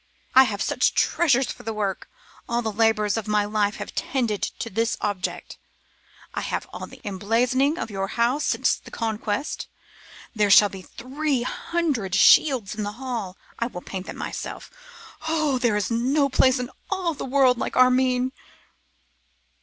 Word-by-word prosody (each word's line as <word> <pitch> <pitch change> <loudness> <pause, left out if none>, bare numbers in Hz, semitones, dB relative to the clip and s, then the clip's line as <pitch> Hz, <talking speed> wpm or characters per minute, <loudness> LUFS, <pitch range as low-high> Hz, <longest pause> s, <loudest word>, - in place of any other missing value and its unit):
I 265 +1 +8
have 205 -4 -2
such - - +1
treasures 270 -6 +2
for - - -10
the 225 0 -5
work. 200 -2 -3 0.4
All 235 0 0
the 220 - -1
labours 215 -1 +2
of 225 - -4
my 210 -1 +2
life 205 0 0
have - - -7
tended 235 -6 -1
to - - -4
this 225 +3 0
object. 200 -3 -4 0.7
I - - -2
have - - -3
all - - -6
the - - -15
emblazonings 235 - +1
of 225 - -4
your 195 -1 -2
house 240 +7 0
since - - +1
the - - -14
Conquest. 220 +3 -3 0.7
There 210 -2 +2
shall 205 +1 +7
be 190 -1 -9
three 260 +5 -3
hundred 260 - -2
shields 240 +1 +5
in 215 - -5
the 205 0 -3
hall. 230 -6 -5 0.2
I 235 - 0
will 180 -7 -8
paint 190 -1 -6
them - - -7
myself. - - -6 0.6
Oh! 310 -5 +1
there 235 -4 +2
is 210 +2 -2
no 270 +5 +2
place 260 0 +4
in 250 0 -4 0.2
the 360 -6 -2
world 260 -2 +4
like - - -3
Armine! 255 0 +3
235 Hz, 160 wpm, -24 LUFS, 210-260 Hz, 0.7 s, I